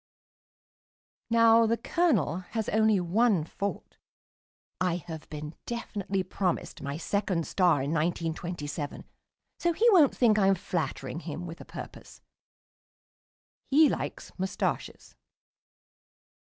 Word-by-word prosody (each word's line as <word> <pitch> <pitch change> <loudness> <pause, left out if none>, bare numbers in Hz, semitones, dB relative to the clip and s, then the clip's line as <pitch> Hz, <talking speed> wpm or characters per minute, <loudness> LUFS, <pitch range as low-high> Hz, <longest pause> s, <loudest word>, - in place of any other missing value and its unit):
Now 230 0 +6
the 230 +1 +1
Colonel 245 - +1 0.2
has 220 - -1
only 220 -2 +3
one 190 +1 +2
fault 200 +5 -5 0.8
(I 180 -2 +1
have 165 -2 -8
been 150 0 -6
definitely 205 -5 -3
promised 185 -1 -2
my 140 +1 -4
second 185 -1 -1
star 175 -8 +2
in 140 - -2
1927, 160 -2 -3 0.6
so 345 0 +1
he 455 +8 +3
won't 325 -9 +5
think 220 -4 +4
I 195 - +4
am 195 - +5
flattering 165 -3 -3
him 170 0 -6
with 170 -1 -8
a - - -10
purpose): - - -10 1.5
he 300 +2 +6
likes - - -4
moustaches. 190 +1 -3
185 Hz, 110 wpm, -28 LUFS, 165-225 Hz, 1.5 s, Now